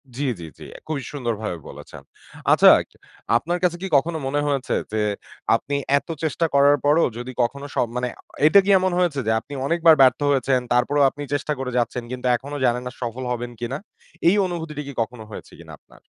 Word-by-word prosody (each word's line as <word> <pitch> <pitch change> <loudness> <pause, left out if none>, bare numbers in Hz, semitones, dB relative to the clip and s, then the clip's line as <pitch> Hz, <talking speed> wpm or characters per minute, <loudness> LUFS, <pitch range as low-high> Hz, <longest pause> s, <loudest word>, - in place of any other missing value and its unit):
জ্বী, 145 +3 -2
জ্বী, 85 - -7
জ্বী। - - -11
অ্যা - - -12
খুবই 155 -3 -3
সুন্দরভাবে 110 -9 -3
বলেছেন। - - -11 0.5
আচ্ছা - - +7 0.7
আপনার 175 +8 -2
কাছে 175 -1 +1
কি 195 - -3
কখনো 160 +4 -1
মনে 145 +2 0
হয়েছে 140 -2 -1 0.2
যে 110 0 0 0.5
আপনি 140 - -3 0.2
এত - - -5 0.2
চেষ্টা 160 +2 0
করার 140 +1 +5
পরও 150 +3 +4
যদি 120 +1 -6
কখনো 140 +4 -3
স - - -14 0.2
মানে 125 0 -1
অ - - -14 0.3
এটা 180 +6 +7
কি - - -1
এমন 185 0 0
হয়েছে 170 -6 +1
যে - - +3
আপনি 125 +6 -12
অনেকবার 165 +1 +5
ব্যর্থ 130 -1 +5
হয়েছেন 130 -1 +2
তারপরেও 140 +4 +2
আপনি 145 +2 -8
চেষ্টা 145 +1 -1
করে 130 -1 -3
যাচ্ছেন 120 0 -1
কিন্তু 125 0 -6
এখনো 140 +4 -6
জানেন 125 0 +1
না - - -5
সফল 120 +1 -4
হবেন 120 0 -4
কিনা? 120 +3 -3 0.5
এই 180 - +5
অনুভূতিটা 165 -4 -5
কি 140 - -7
কখনো 115 0 -5
হয়েছে - - -10
কিনা - - -12
আপনার? - - -22
140 Hz, 195 wpm, -22 LUFS, 125-155 Hz, 0.7 s, আচ্ছা